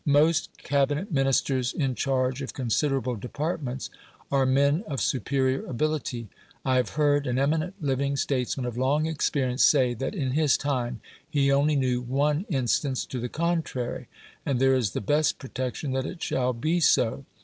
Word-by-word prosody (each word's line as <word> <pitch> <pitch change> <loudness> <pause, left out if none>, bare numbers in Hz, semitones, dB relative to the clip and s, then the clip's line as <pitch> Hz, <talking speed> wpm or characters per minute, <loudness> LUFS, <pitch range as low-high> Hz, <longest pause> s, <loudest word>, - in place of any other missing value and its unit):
Most 150 +3 +3
Cabinet 145 +7 0
Ministers 135 -2 +1
in 135 -4 0
charge 130 +1 0
of 135 - -6
considerable 130 0 0
departments 135 - -4 0.4
are 135 -1 +3
men 140 +6 +3
of 140 -4 -3
superior 130 0 0
ability; 135 -4 -2 0.4
I 130 -1 +3
have 125 0 -1
heard 145 -2 +3
an 125 0 0
eminent 155 +7 0
living 140 -1 0
statesman 130 -1 -1
of 120 0 -4
long 145 +4 +2
experience 140 -4 0
say 130 -4 +4
that 135 - -4
in 135 -8 -1
his 145 -3 +3
time 125 -5 -2 0.3
he 140 -3 +2
only 145 +2 +3
knew 125 -3 +1
one 145 - 0
instance 135 -2 0
to 130 - -5
the 120 +1 -3
contrary. 160 -7 -2 0.4
And 135 -3 0
there 135 0 +4
is 120 -7 +1
the - - -2
best 150 +8 +1
protection 130 +1 -4
that 130 0 -1
it 180 - -7
shall 125 -1 0
be 155 +9 0
so. 135 -4 +2
135 Hz, 160 wpm, -26 LUFS, 125-145 Hz, 0.4 s, say